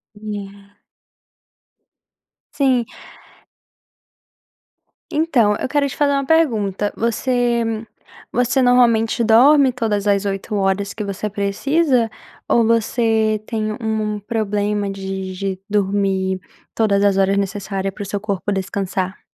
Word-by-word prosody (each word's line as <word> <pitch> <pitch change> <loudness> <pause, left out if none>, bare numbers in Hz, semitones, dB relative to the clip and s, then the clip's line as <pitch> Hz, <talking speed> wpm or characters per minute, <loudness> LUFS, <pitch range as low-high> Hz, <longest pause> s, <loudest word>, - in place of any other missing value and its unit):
É. 205 -1 -9 1.7
Sim. 260 -4 +2 2.3
Então, 255 -10 +2
eu - - -3
quero 285 -1 +1
te - - -8
fazer 285 -1 +2
uma 275 -1 0
pergunta: 215 - +1
você 235 +1 0 0.7
você 245 +2 +1
normalmente 235 -2 +3
dorme 260 +4 +6
todas 215 -4 -1
as 200 0 +2
8 195 +2 -3
horas 200 0 0
que 215 - -5
você 200 +1 -4
precisa, 235 +5 +1 0.4
ou 230 -1 +3
você 225 -1 +1
tem, 215 -2 -2
u - - -6
um 215 -2 -2
problema 205 -2 -1
de 190 -1 -5
de 190 0 -3
dormir 195 -2 0 0.3
todas 200 -3 +2
as 200 -1 +3
horas 195 0 +2
necessária 195 -1 -2
para 205 - -8
o - - -5
seu 205 0 -3
corpo 205 -1 -2
descansar? 190 -1 -3
210 Hz, 120 wpm, -19 LUFS, 200-235 Hz, 2.3 s, dorme